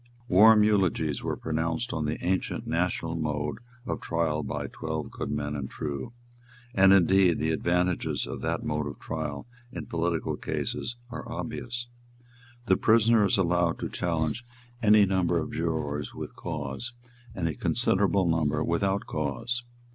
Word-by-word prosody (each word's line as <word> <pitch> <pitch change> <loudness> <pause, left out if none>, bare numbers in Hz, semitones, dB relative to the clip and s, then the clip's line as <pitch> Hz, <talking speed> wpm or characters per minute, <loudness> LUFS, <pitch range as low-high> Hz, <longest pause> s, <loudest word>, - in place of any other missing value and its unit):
Warm 105 +3 +7
eulogies 90 -8 +2
were - - -2
pronounced 80 +9 -2
on 80 -1 -1
the 75 +1 -1
ancient 95 +1 -1
national 85 -1 -1
mode 75 -2 -2 0.3
of - - -3
trial 80 -2 0
by - - -3
twelve - - -4
good - - -4
men 75 0 -2
and 70 -2 -4
true; 70 - -4 0.6
and 95 0 +6
indeed 95 -2 +5
the 80 - 0
advantages 90 +2 0
of - - -6
that - - -1
mode 75 -1 -1
of 70 - -6
trial 75 -3 -4 0.3
in - - -6
political 85 -1 -1
cases 120 - -3 0.2
are 125 -1 -6
obvious. 120 0 -4 0.8
The - - +4
prisoner 115 -1 +5
is 100 - +2
allowed 85 -2 +2
to - - -4
challenge 85 +4 -1 0.4
any 105 -2 +6
number 95 -3 +1
of 80 - -2
jurors 75 -3 -2
with - - -7
cause, 75 - -5 0.4
and 85 -3 -1
a 80 - -1
considerable 95 +6 +2
number 80 -2 +1
without 95 +4 0
cause. 75 - -2
85 Hz, 145 wpm, -28 LUFS, 75-95 Hz, 0.8 s, Warm